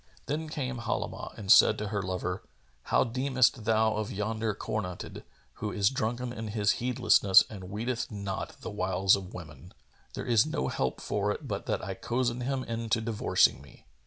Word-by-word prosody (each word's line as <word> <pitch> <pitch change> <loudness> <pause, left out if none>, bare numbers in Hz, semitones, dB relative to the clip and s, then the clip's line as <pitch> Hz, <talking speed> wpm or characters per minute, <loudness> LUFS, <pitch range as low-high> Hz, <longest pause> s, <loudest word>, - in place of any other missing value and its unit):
Then 155 +3 -3
came 130 -5 -3
Halimah 115 - -4
and 100 -3 0
said - - +7
to 105 -1 -3
her 100 -1 -1
lover, 95 -1 -3 0.4
"How - - +3
deemest 130 -2 +1
thou 110 -1 +2
of 110 -1 -3
yonder 110 +1 -2
cornuted, 95 -4 -5 0.4
who 105 -1 -2
is 100 +2 +2
drunken 120 0 -2
in 110 -2 -5
his 105 -1 +2
heedlessness 120 -6 +5
and 95 -4 -8
weeteth 115 +4 -2
not 100 -3 -5
the - - -5
wiles 95 -1 +3
of 95 -2 -7
women? 85 +1 -11 0.4
There - - -4
is 115 -2 +4
no 155 - -2
help 65 -1 -2
for - - 0
it - - -5
but - - -4
that - - -1
I - - -3
cozen 120 0 -1
him 130 +1 -1
into 115 -1 -1
divorcing 110 -10 +2
me. 70 - -17
110 Hz, 175 wpm, -29 LUFS, 100-120 Hz, 0.4 s, said